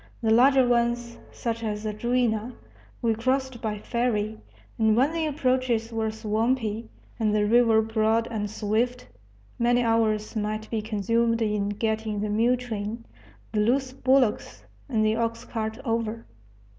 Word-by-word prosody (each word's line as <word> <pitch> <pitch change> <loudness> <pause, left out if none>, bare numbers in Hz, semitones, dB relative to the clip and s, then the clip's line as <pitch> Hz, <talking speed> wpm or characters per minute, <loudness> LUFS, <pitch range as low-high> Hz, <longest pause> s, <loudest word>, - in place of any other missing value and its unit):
The 220 - +2
larger 260 +2 +5
ones, 235 0 0
such 230 -1 -4
as 210 -1 -3
the 215 -1 -2
Juina, 235 0 0 0.5
we 230 -1 +3
crossed 260 +2 -1
by 215 -1 -2
ferry, 220 -1 -1 0.4
and 220 0 +3
when 275 +6 +3
the 325 -1 0
approaches 255 -5 0
were 220 -1 0
swampy, 220 +1 -1 0.3
and 215 -2 +1
the 210 0 +2
river 225 0 +4
broad 220 +1 +1
and 210 -2 -2
swift, 225 +4 -1 0.5
many 245 +1 +3
hours 225 -1 +1
might 215 0 -2
be 225 -2 -1
consumed 230 +2 0
in 210 -2 0
getting 220 0 -2
the 210 +1 -2
mule 230 +4 +2
train, 230 -1 -5 0.5
the 215 - 0
loose 255 +4 +1
bullocks, 260 -4 +1 0.3
and 220 -4 +1
the 215 +1 +2
ox 230 0 -2
cart 220 -1 -4
over. 230 -1 -2
225 Hz, 145 wpm, -26 LUFS, 215-240 Hz, 0.5 s, larger